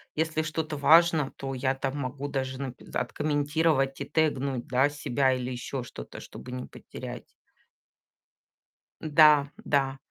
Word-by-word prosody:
Если 160 Hz, 0 st, 0 dB
что-то 155 Hz, 0 st, -3 dB
важно, 160 Hz, -1 st, +5 dB
то 135 Hz, -1 st, -5 dB
я 130 Hz, +1 st, +1 dB
там 135 Hz, +1 st, -3 dB
могу 140 Hz, +1 st, -4 dB
даже 130 Hz, -2 st, -3 dB
нап 130 Hz, -3 st, -4 dB, 0.2 s
откомментировать 145 Hz, -2 st, 0 dB
и -, -, -2 dB
тегнуть, 140 Hz, -5 st, 0 dB
да, 130 Hz, +3 st, +3 dB
себя 135 Hz, -2 st, +1 dB
или 125 Hz, -1 st, -3 dB
ещё 125 Hz, +2 st, -4 dB
что-то, -, -, -9 dB
чтобы 125 Hz, -, -10 dB
не 125 Hz, 0 st, -5 dB
потерять. -, -, -9 dB, 1.8 s
Да, 150 Hz, -2 st, +6 dB, 0.2 s
да. 135 Hz, -2 st, +1 dB
140 Hz, 130 wpm, -28 LUFS, 130-155 Hz, 1.8 s, Да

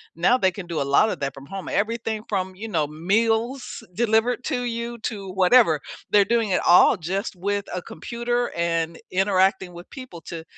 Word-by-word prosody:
Now 210 Hz, +10 st, +3 dB
they 190 Hz, -4 st, +3 dB
can 185 Hz, 0 st, -8 dB
do 170 Hz, -3 st, -3 dB
a -, -, +2 dB
lot 215 Hz, +10 st, +5 dB
of -, -, -5 dB
that 140 Hz, -1 st, -3 dB
from 135 Hz, -, -11 dB
home. 195 Hz, +5 st, -7 dB
Everything 220 Hz, 0 st, -1 dB
from, 190 Hz, -2 st, -2 dB
you 215 Hz, +4 st, -7 dB
know, 160 Hz, -8 st, 0 dB
meals 225 Hz, -, -1 dB
delivered 235 Hz, +4 st, +1 dB
to 245 Hz, -, -1 dB
you 235 Hz, 0 st, -4 dB
to 200 Hz, -4 st, -4 dB
whatever. 190 Hz, -3 st, +5 dB, 0.3 s
They're 205 Hz, -1 st, +5 dB
doing 230 Hz, 0 st, +1 dB
it 185 Hz, -, +1 dB
all 175 Hz, -, +6 dB
just 190 Hz, +5 st, -3 dB
with 200 Hz, +2 st, -2 dB
a 180 Hz, -, -2 dB
computer 240 Hz, +5 st, -3 dB
and 165 Hz, -1 st, -1 dB
interacting 190 Hz, 0 st, +2 dB
with 175 Hz, 0 st, -11 dB
people 255 Hz, -, -9 dB
to 165 Hz, +1 st, -8 dB
195 Hz, 185 wpm, -23 LUFS, 175-230 Hz, 0.3 s, all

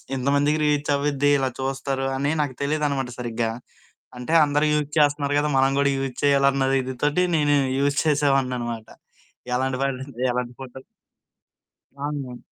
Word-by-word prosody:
ఇంతమందికి 140 Hz, +3 st, +1 dB
రీచ్ 150 Hz, -1 st, +1 dB
అవ్విద్ది, 145 Hz, 0 st, +1 dB
ఇలా 135 Hz, -1 st, 0 dB
చూస్తారు, 135 Hz, 0 st, -2 dB
అని 140 Hz, +2 st, 0 dB
నాకు 135 Hz, -4 st, -3 dB
తెలీదనమాట 140 Hz, -3 st, -1 dB
సరిగ్గా. 115 Hz, -1 st, -2 dB, 0.7 s
అంటే, 125 Hz, +6 st, -4 dB
అందరూ 145 Hz, +1 st, +1 dB
యూజ్ 150 Hz, -1 st, 0 dB
చేస్తన్నారు 145 Hz, -1 st, +2 dB
గదా! 150 Hz, 0 st, 0 dB
మనం 135 Hz, +1 st, +3 dB
గూడా 140 Hz, 0 st, +3 dB
యూజ్ 135 Hz, -2 st, -4 dB
చేయాలన్న 140 Hz, -1 st, +3 dB
ఇది 130 Hz, 0 st, -5 dB
తోటి 150 Hz, +5 st, +2 dB
నేను 145 Hz, -1 st, +3 dB, 0.2 s
యూజ్ 140 Hz, 0 st, +1 dB
చేసేవాడిననమాట. 130 Hz, -6 st, 0 dB, 0.7 s
ఎలాంటి 130 Hz, +1 st, 0 dB
పడిందే 130 Hz, -2 st, -4 dB
అలాంటి 125 Hz, 0 st, -3 dB
ఫోటో 130 Hz, 0 st, -9 dB, 1.2 s
అవును. 140 Hz, -3 st, -5 dB
140 Hz, 135 wpm, -23 LUFS, 130-145 Hz, 1.2 s, మనం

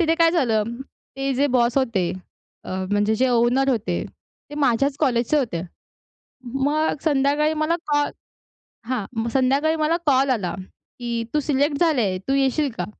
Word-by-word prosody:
तिथे 330 Hz, -1 st, +3 dB
काय 330 Hz, 0 st, +4 dB
झालं, 240 Hz, -11 st, +2 dB, 0.5 s
ते 270 Hz, 0 st, -1 dB
जे 280 Hz, +3 st, +2 dB
बॉस 240 Hz, +1 st, +2 dB
होते 205 Hz, -9 st, 0 dB, 0.5 s
अ, -, -, -8 dB, 0.2 s
म्हणजे 205 Hz, +1 st, +2 dB
जे 255 Hz, +3 st, +2 dB
ओनर 245 Hz, +3 st, +2 dB
होते 230 Hz, -4 st, -1 dB, 0.5 s
ते 295 Hz, -, -7 dB
माझ्याच 275 Hz, 0 st, +1 dB
कॉलेजचे 240 Hz, +3 st, +2 dB
होते. 225 Hz, -, -2 dB, 0.9 s
मग 295 Hz, +4 st, +1 dB
संध्याकाळी 295 Hz, +1 st, +2 dB
मला 310 Hz, +2 st, 0 dB
कॉल 290 Hz, -1 st, +1 dB, 0.8 s
हां, 250 Hz, -6 st, -1 dB
मग 225 Hz, +1 st, -1 dB
संध्याकाळी 275 Hz, +4 st, +2 dB
मला 315 Hz, +1 st, +1 dB
कॉल 270 Hz, -2 st, +3 dB
आला 185 Hz, -8 st, -1 dB, 0.5 s
की 235 Hz, -1 st, -2 dB
तू 300 Hz, -, +2 dB
सिलेक्ट 285 Hz, 0 st, 0 dB
झाली 315 Hz, -8 st, +3 dB
आहे, 190 Hz, -3 st, 0 dB
तू 235 Hz, +9 st, -2 dB
येशील 275 Hz, +2 st, +1 dB
का? 180 Hz, -, -2 dB
270 Hz, 155 wpm, -22 LUFS, 235-295 Hz, 0.9 s, काय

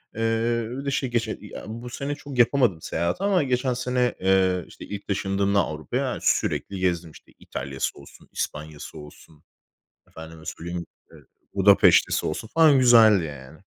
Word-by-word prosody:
Eee, 115 Hz, +1 st, 0 dB
bir 135 Hz, +3 st, -6 dB
de 140 Hz, -, -1 dB
şey, 135 Hz, -1 st, -1 dB
geçe 115 Hz, -2 st, -1 dB
ya, 105 Hz, -, -9 dB
bu 115 Hz, +3 st, -7 dB
sene 140 Hz, +3 st, -4 dB
çok 145 Hz, -2 st, -9 dB
yapamadım 120 Hz, -, +3 dB
seyahati, 85 Hz, -, -2 dB
ama 195 Hz, -5 st, +3 dB
geçen 130 Hz, -1 st, 0 dB
sene, 125 Hz, 0 st, 0 dB
eee, 95 Hz, -1 st, +2 dB
işte, -, -, -12 dB
ilk, 100 Hz, 0 st, -8 dB
taşındığımda 100 Hz, 0 st, 0 dB
Avrupa'ya 80 Hz, -5 st, -2 dB
sürekli 95 Hz, -, 0 dB
gezdim. 90 Hz, -3 st, -1 dB
İşte, -, -, -18 dB
İtalya'sı 65 Hz, +1 st, -5 dB
olsun, 70 Hz, -, -16 dB
İspanya'sı 75 Hz, 0 st, -6 dB
olsun, 75 Hz, +1 st, -14 dB, 0.7 s
efendime 80 Hz, 0 st, -11 dB
söyleyeyim, 85 Hz, 0 st, -5 dB, 0.2 s
işte, -, -, -18 dB, 0.4 s
Budapeşte'si 100 Hz, 0 st, +4 dB
olsun 95 Hz, +8 st, -4 dB
falan, 160 Hz, -4 st, +6 dB
güzeldi 115 Hz, -7 st, +6 dB
yani. 70 Hz, 0 st, -10 dB
100 Hz, 150 wpm, -24 LUFS, 85-125 Hz, 0.7 s, falan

